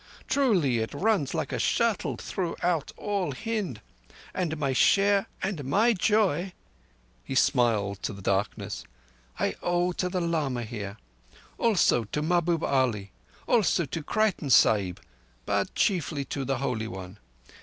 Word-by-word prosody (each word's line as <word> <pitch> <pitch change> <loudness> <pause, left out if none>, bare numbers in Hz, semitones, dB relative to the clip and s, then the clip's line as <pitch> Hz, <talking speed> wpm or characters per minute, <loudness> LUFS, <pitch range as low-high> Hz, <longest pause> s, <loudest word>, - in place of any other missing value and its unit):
Truly, 185 - +2
it 110 0 -3
runs 200 -9 +1
like - - -2
a - - -2
shuttle 230 -3 +1
throughout 175 -3 -2
all 200 -7 -2
Hind. 200 - -3 0.5
And 165 -4 -2
my 140 -3 0
share 200 +8 +4 0.2
and 190 -6 -2
my 210 - +3
joy"—he 145 - -2
smiled 110 -7 +2
to - - -2
the 100 -2 -10
darkness—"I 65 - -3
owe 175 +1 +1
to 180 +1 -2
the 180 0 -1
lama 155 -8 -1
here. 105 -3 -6 0.6
Also 195 - +3
to 150 +9 -3
Mahbub 170 0 +1
Ali—also 135 - 0
to 155 +4 -4
Creighton 200 -3 0
Sahib, 100 -7 +4 0.5
but 100 -1 -1
chiefly 155 -7 0
to 135 +1 -4
the 135 0 0
Holy 120 -4 -2
One. 95 0 -8
145 Hz, 125 wpm, -27 LUFS, 110-185 Hz, 0.6 s, share